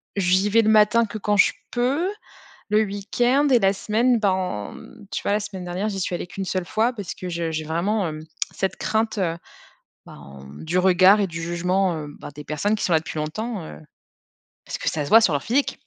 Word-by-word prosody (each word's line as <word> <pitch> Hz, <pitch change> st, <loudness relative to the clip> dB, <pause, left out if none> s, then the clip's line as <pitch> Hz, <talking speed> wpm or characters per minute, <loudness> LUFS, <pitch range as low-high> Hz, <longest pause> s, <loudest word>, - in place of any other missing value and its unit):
j'y 190 Hz, +1 st, +2 dB
vais 230 Hz, +2 st, +5 dB
le 215 Hz, -, +1 dB
matin 220 Hz, +2 st, +5 dB
que 215 Hz, 0 st, -7 dB
quand 210 Hz, 0 st, 0 dB
je 200 Hz, -, +5 dB, 0.2 s
peux, 265 Hz, +8 st, 0 dB, 0.6 s
le 210 Hz, +1 st, +4 dB
week-end 240 Hz, +7 st, +1 dB
et 250 Hz, -3 st, +5 dB
la 195 Hz, -2 st, +3 dB
semaine, 230 Hz, +4 st, +1 dB
ben, 185 Hz, -, -1 dB
mmh. 210 Hz, -4 st, -14 dB
Tu -, -, -3 dB
vois, -, -, 0 dB
la 205 Hz, -, +2 dB
semaine 195 Hz, -3 st, -7 dB
dernière, 180 Hz, +4 st, -3 dB
j'y 195 Hz, -2 st, -4 dB
suis 180 Hz, -, -2 dB
allée 175 Hz, -, -4 dB
qu' 180 Hz, -, -14 dB
1 195 Hz, -, -2 dB
seule 185 Hz, -1 st, -2 dB
fois 225 Hz, +6 st, +1 dB
parce 205 Hz, -6 st, -6 dB
que 180 Hz, -, -6 dB
je 170 Hz, -1 st, -2 dB
j'ai 155 Hz, 0 st, -3 dB
vraiment, 180 Hz, +7 st, -1 dB
hem, 155 Hz, 0 st, -7 dB, 0.3 s
cette 190 Hz, -, -2 dB
crainte, 220 Hz, 0 st, -1 dB
heu, 170 Hz, -4 st, -1 dB, 0.7 s
ben, 70 Hz, 0 st, -12 dB
du 170 Hz, +3 st, -1 dB
regard 185 Hz, +2 st, +5 dB
et 200 Hz, -, +2 dB
du 165 Hz, -1 st, -6 dB
jugement, 180 Hz, +2 st, 0 dB
heu, 150 Hz, -1 st, -6 dB
ben -, -, -9 dB
des 150 Hz, +1 st, -9 dB
personnes 155 Hz, +9 st, -1 dB
qui -, -, -5 dB
sont 180 Hz, -, 0 dB
là 160 Hz, -, +5 dB
depuis 155 Hz, -, -7 dB
longtemps, 195 Hz, +8 st, -4 dB
heu, 75 Hz, -, -9 dB, 0.9 s
parce -, -, -5 dB
que -, -, -1 dB
ça 150 Hz, -2 st, -2 dB
se -, -, -6 dB
voit 225 Hz, -, +8 dB
sur 180 Hz, -8 st, +3 dB
leur 140 Hz, -, -1 dB
physique. 270 Hz, +5 st, 0 dB
195 Hz, 225 wpm, -23 LUFS, 170-215 Hz, 0.9 s, voit